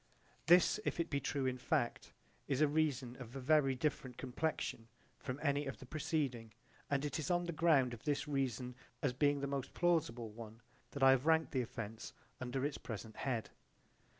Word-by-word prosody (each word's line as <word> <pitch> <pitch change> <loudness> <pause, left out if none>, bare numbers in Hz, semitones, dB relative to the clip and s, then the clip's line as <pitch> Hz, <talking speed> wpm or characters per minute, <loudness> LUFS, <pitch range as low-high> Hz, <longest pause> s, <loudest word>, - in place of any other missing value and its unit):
J.B.) - - -33
This, 180 +3 +3
if - - -2
it 170 -1 -1
be 140 - +1
true 140 0 -1
in 130 -1 -1
fact, 120 -1 -1 0.4
is 135 -2 0
a 155 - +5
reason 140 -5 0
of 125 0 -9
a - - -3
very 135 0 +3
different 130 -2 -2
complexion 130 -3 -2 0.3
from 130 0 -4
any 145 -1 +1
of 135 - -4
the - - -11
preceding 140 - -2 0.3
and 140 0 +1
it 150 - -2
is 155 - -3
on 175 0 +2
the 170 - -2
ground 150 -7 +4
of 115 - -8
this 145 0 0
reason 130 -3 -1 0.3
as 135 -3 +2
being 145 +2 +2
the - - 0
most 140 -1 -3
plausible 130 -10 +1
one 110 +1 -10 0.3
that 140 - -3
I 135 - +9
have 135 +3 +2
ranked 160 0 +4
the 130 - +1
offence 115 -2 -6 0.3
under 130 +2 -2
its 145 - -2
present 110 -1 -7
head. 120 -5 -2
135 Hz, 195 wpm, -36 LUFS, 125-150 Hz, 0.4 s, I